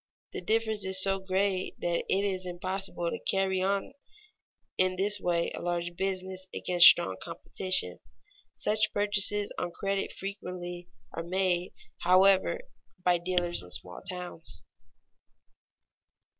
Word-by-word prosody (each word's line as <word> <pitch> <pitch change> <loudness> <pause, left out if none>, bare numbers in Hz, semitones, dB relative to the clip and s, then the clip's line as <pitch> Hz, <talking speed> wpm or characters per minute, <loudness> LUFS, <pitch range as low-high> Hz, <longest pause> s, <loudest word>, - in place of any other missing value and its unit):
The - - -6
difference 220 -1 0
is 190 0 +2
so 195 0 +2
great 190 0 -1
that 170 -1 -1
it 195 +1 +1
is 185 -2 -2
impossible 180 -1 -3
to - - -4
carry 190 -1 +1
on 195 +6 -1 0.8
in 185 0 +1
this 205 +2 0
way 170 -2 0
a - - -7
large 175 0 -3
business 190 0 -3
against 175 -1 +7
strong 95 - +6
competition. 185 - 0 0.6
Such 215 0 +1
purchases 205 0 +3
on 175 - -2
credit 195 0 -1
frequently 180 -3 -7 0.2
are 165 - -4
made, 180 0 -1 0.3
however, 190 - +4 0.4
by 180 -1 +3
dealers 175 0 -1
in 90 - -13
small 90 0 -6
towns. 180 -3 -7
185 Hz, 125 wpm, -29 LUFS, 175-195 Hz, 0.8 s, against